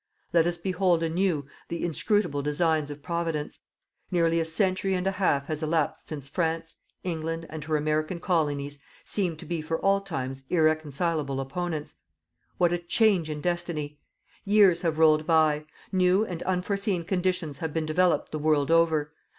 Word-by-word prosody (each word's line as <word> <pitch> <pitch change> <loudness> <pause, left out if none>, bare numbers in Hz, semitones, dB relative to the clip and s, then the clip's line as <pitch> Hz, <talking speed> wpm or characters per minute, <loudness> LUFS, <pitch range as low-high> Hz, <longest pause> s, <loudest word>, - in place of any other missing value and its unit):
Let 170 -1 +4
us 175 0 -1
behold 180 -1 +1
anew 165 -3 0 0.2
the 170 - -3
inscrutable 175 -2 +1
designs 150 +1 +1
of 145 0 -8
Providence. 165 -3 -3 0.5
Nearly 165 -2 +2
a 165 - 0
century 190 +3 0
and 180 0 -2
a 195 - +2
half 185 -8 +1
has 155 +1 -3
elapsed 160 0 -1
since 145 -3 -6
France, 165 +1 -2 0.3
England 165 -1 -3
and 155 -1 -6
her 155 -1 +1
American 155 +3 -1
Colonies 145 -5 -1 0.3
seemed 180 -6 -1
to - - -9
be 170 -2 -3
for 165 +1 -2
all 195 0 +3
times 135 -8 -5
irreconcilable 155 -3 +1
opponents. 155 +3 -4 0.6
What 175 -1 +3
a 175 - 0
change 180 -1 +2
in 150 -1 -4
Destiny! 170 -4 -3 0.4
Years 200 -4 +5
have 165 -3 0
rolled 155 -1 +4
by. 155 -2 +3 0.3
New 185 +2 +3
and 175 -5 -6
unforeseen 190 0 -1
conditions 180 -5 -1
have 160 -2 -3
been 160 0 -1
developed 175 +3 +2
the 155 - -3
world 150 -1 +2
over. 160 -2 +3
165 Hz, 160 wpm, -27 LUFS, 155-180 Hz, 0.6 s, Years